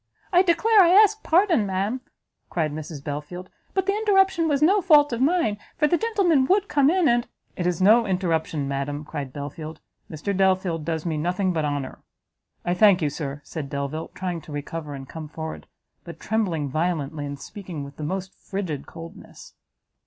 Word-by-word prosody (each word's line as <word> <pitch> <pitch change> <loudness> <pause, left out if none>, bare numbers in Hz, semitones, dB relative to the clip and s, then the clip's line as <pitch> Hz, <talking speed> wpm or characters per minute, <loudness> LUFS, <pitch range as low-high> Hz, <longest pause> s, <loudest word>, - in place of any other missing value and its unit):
"I 355 - +7
declare 400 +4 +4
I 345 - +6
ask 425 +3 +5
pardon, 335 - +3
ma'am," 200 +7 -1 0.5
cried 155 -3 -1
Mrs 150 -1 -7
Belfield, 150 +5 -6 0.2
"but 385 -1 +1
the 395 - +2
interruption 385 -5 +3
was 290 -3 +1
no 390 +6 +4
fault 295 -7 +5
of 235 - -2
mine, 270 - +2 0.2
for 300 - +3
the 345 - +3
gentleman 375 -10 +2
would 400 +1 +2
come 285 -1 +3
in; 360 0 +3
and 240 -1 +2 0.2
" - - -43
"It 175 - -1
is 180 0 0
no 225 +4 +6
interruption, 165 -6 -1
madam;" 140 +2 -3
cried 140 -3 -5
Belfield, 155 +3 -7 0.3
"Mr 165 +6 -3
Delvile 185 -3 +2
does 160 +1 -3
me 160 -3 -1
nothing 180 +4 0
but 160 -2 0
honour." 145 -2 -3 0.7
"I 175 - +1
thank 190 -2 +5
you, 145 - +1
Sir!" 145 -1 -5
said 150 -4 -6
Delvile, 140 +3 -4
trying 180 -3 -3
to 155 - -13
recover 145 0 -5
and 135 -1 -9
come 160 +1 -8
forward, 160 +1 -7 0.4
but - - -10
trembling 180 -10 -1
violently, 155 0 -2
and 140 0 -6
speaking 175 -2 -7
with 140 0 -11
the 155 - -6
most 190 +4 -4
frigid 180 -8 -5
coldness. 165 +4 -12
180 Hz, 180 wpm, -24 LUFS, -, 0.7 s, I